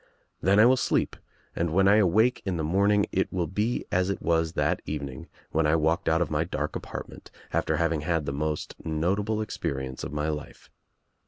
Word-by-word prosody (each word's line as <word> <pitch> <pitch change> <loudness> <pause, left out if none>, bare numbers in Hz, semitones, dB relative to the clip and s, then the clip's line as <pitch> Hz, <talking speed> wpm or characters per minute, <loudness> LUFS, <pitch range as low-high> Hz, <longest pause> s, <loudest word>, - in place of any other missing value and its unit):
Then 100 +3 +4
I 110 - +8
will 130 +2 +5
sleep - - 0 0.4
and 85 0 0
when 95 +3 +4
I 100 +2 +6
awake 110 +5 +3
in 95 -3 -2
the 80 - -2
morning 100 +5 +3
it 95 - 0
will 90 -2 0
be 105 +7 -1
as 90 +1 +2
it 100 - -2
was 80 -1 +1
that - - 0
evening 70 -3 -5 0.2
when 80 -1 +2
I 75 - +3
walked 80 +4 +1
out 80 +2 +3
of 80 - -7
my - - +1
dark - - -3
apartment - - -7 0.2
after - - +1
having 85 -2 +1
had 80 -1 0
the 70 - -2
most 75 +2 -2
notable 100 +7 0
experience 65 -9 -4
of - - -5
my 75 +1 -1
life. 75 -1 -7
85 Hz, 195 wpm, -27 LUFS, 75-100 Hz, 0.4 s, I